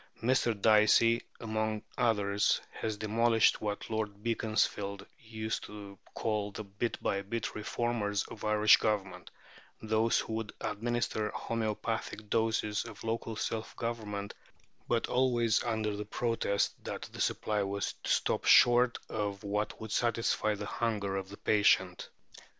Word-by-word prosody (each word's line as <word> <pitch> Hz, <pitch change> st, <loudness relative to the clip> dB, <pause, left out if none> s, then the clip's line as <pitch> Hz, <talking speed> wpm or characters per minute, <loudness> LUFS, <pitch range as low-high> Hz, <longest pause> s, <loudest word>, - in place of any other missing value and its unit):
Mr. 120 Hz, -3 st, +2 dB
Dicey, 110 Hz, +2 st, +5 dB, 0.2 s
among 110 Hz, -1 st, -2 dB
others, 105 Hz, -4 st, +2 dB
has 110 Hz, -2 st, -4 dB
demolished 110 Hz, +1 st, +3 dB
what 105 Hz, -1 st, -3 dB
Lord 105 Hz, -2 st, -3 dB
Beaconsfield 110 Hz, -3 st, -1 dB
used 110 Hz, -1 st, -4 dB
to 100 Hz, -2 st, -10 dB, 0.2 s
call 105 Hz, -2 st, -1 dB
the 110 Hz, -, -6 dB
"bit 105 Hz, +4 st, -3 dB
by 100 Hz, -, 0 dB
bit" 115 Hz, +4 st, -4 dB
reformers 105 Hz, -2 st, -1 dB
of 110 Hz, -, -11 dB
Irish 105 Hz, 0 st, +6 dB
Government 100 Hz, -3 st, -2 dB, 0.5 s
those 110 Hz, +1 st, +2 dB
who 110 Hz, -, -2 dB
would 110 Hz, -1 st, -4 dB
administer 110 Hz, 0 st, -1 dB
homoeopathic 110 Hz, -1 st, -3 dB
doses 110 Hz, -2 st, +1 dB
of 115 Hz, -3 st, -10 dB
local 115 Hz, 0 st, -3 dB
self 110 Hz, +1 st, -3 dB
government, 105 Hz, -4 st, -4 dB, 0.5 s
but 115 Hz, -1 st, +1 dB
always 120 Hz, -3 st, +2 dB
under 110 Hz, -3 st, -1 dB
protest 115 Hz, -2 st, -1 dB
that -, -, -5 dB
the -, -, -5 dB
supply 105 Hz, -1 st, 0 dB
was 100 Hz, 0 st, -2 dB
to -, -, -5 dB
stop -, -, +1 dB
short 120 Hz, 0 st, +6 dB
of 105 Hz, -1 st, -3 dB
what 105 Hz, +1 st, -2 dB
would 110 Hz, -1 st, -7 dB
satisfy 115 Hz, -2 st, +1 dB
the 105 Hz, -, -5 dB
hunger 100 Hz, -2 st, -1 dB
of 95 Hz, -1 st, -4 dB
the 100 Hz, -, -10 dB
patient. 95 Hz, -3 st, +2 dB
110 Hz, 135 wpm, -31 LUFS, 105-115 Hz, 0.5 s, Irish